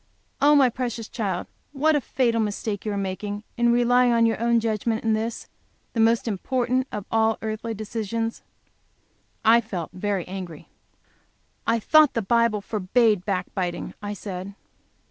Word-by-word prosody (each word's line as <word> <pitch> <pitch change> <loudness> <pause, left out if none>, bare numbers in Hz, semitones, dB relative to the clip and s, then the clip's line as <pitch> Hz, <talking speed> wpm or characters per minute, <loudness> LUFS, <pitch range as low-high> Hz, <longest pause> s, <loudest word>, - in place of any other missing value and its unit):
Oh, 295 +1 +6
my 275 -3 +6
precious 235 -2 -3
child, 195 -6 -3 0.3
what 305 +3 +3
a 295 - +2
fatal 235 -2 +1
mistake 210 -1 -3
you - - 0
are 200 - -2
making 205 +2 -4
in 240 -1 +3
relying 245 +1 +4
on 230 -1 +4
your 225 -1 0
own 235 0 +3
judgment 225 0 -1
in 225 -1 +2
this, 220 +1 -3 0.5
the 230 - -2
most 230 +1 +3
important 250 +5 0
of 205 -2 -5 0.3
earthly 220 +1 -4
decisions!" 225 +1 -3 1.0
I 230 +2 +6
felt 185 -7 -5
very 190 -1 -2
angry. 180 -4 -8 1.0
"I 230 0 +3
thought 310 +5 +5
the 230 - 0
Bible 230 0 +2
forbade 210 0 +1
back 185 -3 -2
biting," 175 -2 -3
I 205 0 -4
said. 195 0 -7
225 Hz, 150 wpm, -24 LUFS, 200-235 Hz, 1.0 s, Oh